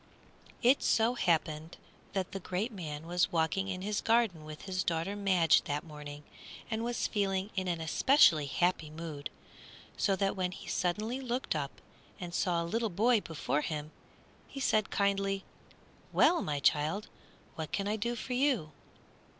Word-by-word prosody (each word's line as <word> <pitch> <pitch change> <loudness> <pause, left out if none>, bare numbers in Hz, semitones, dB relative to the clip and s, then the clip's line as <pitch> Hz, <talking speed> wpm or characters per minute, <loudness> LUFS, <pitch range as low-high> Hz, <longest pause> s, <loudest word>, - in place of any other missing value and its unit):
It 255 +4 +5
so 225 +2 +3
happened 160 -6 0 0.4
that 190 -2 -2
the 195 - -4
great 190 +6 -2
man 160 -6 -6
was 175 +1 +1
walking 170 +4 +1
in 185 -1 -4
his 210 +1 -1
garden 225 -8 +2
with 155 0 -9
his 185 -1 -1
daughter 170 +4 -1
Madge 190 -5 +4
that 145 +2 -2
morning, 150 -2 -9 0.5
and 220 +1 -1
was 240 0 -1
feeling 195 -1 0
in 185 -1 -1
an 175 -2 -1
especially 160 - +5
happy 175 +1 +1
mood, 155 -2 -6 0.7
so 195 - +2
that 195 +1 0
when 185 -1 -1
he 200 - -10
suddenly 210 +8 -1
looked 250 -6 -2
up 140 -2 -4 0.4
and 175 -2 -6
saw 175 -1 +1
a - - -4
little 225 +6 0
boy 220 +5 +3
before 150 -3 -1
him, 150 0 -4 0.6
he 275 - -8
said, 215 -6 +2
kindly, 195 -1 +1 0.7
"Well, 345 -1 +4
my 145 -1 -1
child, 155 +8 +2 0.5
what 160 -2 -5
can 200 0 -1
I 210 - +1
do 235 +3 -2
for 250 - -4
you?" 250 - +1
185 Hz, 160 wpm, -32 LUFS, 160-215 Hz, 0.7 s, It